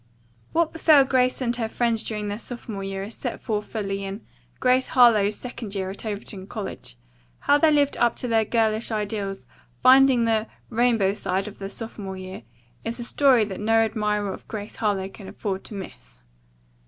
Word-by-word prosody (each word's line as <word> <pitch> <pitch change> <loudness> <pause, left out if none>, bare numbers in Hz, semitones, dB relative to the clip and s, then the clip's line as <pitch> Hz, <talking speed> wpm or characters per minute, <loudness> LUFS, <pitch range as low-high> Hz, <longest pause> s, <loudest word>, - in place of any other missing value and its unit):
What 335 -1 +1
befell 310 -3 +6
Grace 255 -1 +1
and 240 -1 0
her 225 -2 -2
friends 230 -1 0
during 210 -2 -3
their 205 +1 -3
sophomore 230 -5 -6
year 195 0 -4
is 210 +3 -7
set 245 0 -5
forth 210 -2 -2
fully 200 -3 -3
in 195 +2 -6 0.3
"Grace 255 0 +3
Harlowe's 215 -5 +5
Second 235 -4 -6
Year 190 -1 -2
at 205 +3 -7
Overton 200 -2 -5
College." 195 - -7 0.4
How 290 - +4
they 320 - +5
lived 290 -2 +3
up 240 -1 +3
to 250 - -3
their 225 -1 +3
girlish 220 0 +1
ideals, 205 -3 -3 0.4
finding 260 -2 +6
the 225 -1 +1 0.2
"rainbow 225 -4 +3
side" 195 -1 -2
of 210 - -10
their 195 0 -5
sophomore 200 -4 -7
year, 185 0 -8 0.4
is 230 +2 -4
a - - -3
story 250 -2 +4
that 195 -3 -6
no 220 +2 +1
admirer 210 -2 0
of - - -12
Grace 210 -1 -7
Harlowe 200 -3 0
can 195 0 -12
afford 195 -2 -4
to 210 - -7
miss. 185 - -10
215 Hz, 180 wpm, -24 LUFS, 200-240 Hz, 0.4 s, befell